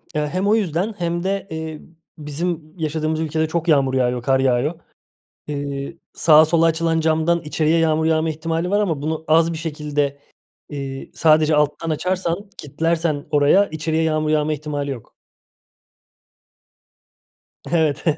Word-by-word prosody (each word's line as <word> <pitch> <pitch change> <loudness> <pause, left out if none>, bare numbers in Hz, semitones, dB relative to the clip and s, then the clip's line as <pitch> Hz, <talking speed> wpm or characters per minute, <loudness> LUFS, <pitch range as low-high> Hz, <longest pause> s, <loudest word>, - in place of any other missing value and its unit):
Eee, 150 0 0
hem 185 +6 -1
o 210 - +4
yüzden 195 0 -1
hem 170 0 -2
de, 195 +1 -2
eee, 160 -1 -6 0.4
bizim 155 +1 -4
yaşadığımız 155 0 -1
ülkede 160 0 -1
çok 170 +1 -2
yağmur 140 -4 +3
yağıyor, 125 -1 +1
kar 135 +1 +2
yağıyor. 135 +5 +1 0.7
Iıı, 140 +1 -4 0.2
sağa 155 -1 +6
sola 165 +1 +3
açılan 165 0 +1
camdan 160 +1 +1
içeriye 155 +2 +1
yağmur 160 -1 +2
yağma 160 0 +2
ihtimali 165 +2 -2
var 205 +2 +2
ama 165 -9 -1
bunu 160 +1 -3
az 165 +2 +4
bir - - -5
şekilde, 150 -3 -2 0.5
eee, 135 -2 -6
sadece 155 -1 +4
alttan 150 +2 0
açarsan, 180 +4 -2
kilitlersen 160 0 -1
oraya 150 +7 +4
içeriye 160 +1 -1
yağmur 155 -1 0
yağma 155 0 +1
ihtimali 145 -1 -4
yok. 125 -5 -9 2.6
Evet. 155 -4 +1
155 Hz, 140 wpm, -21 LUFS, 150-165 Hz, 2.6 s, sağa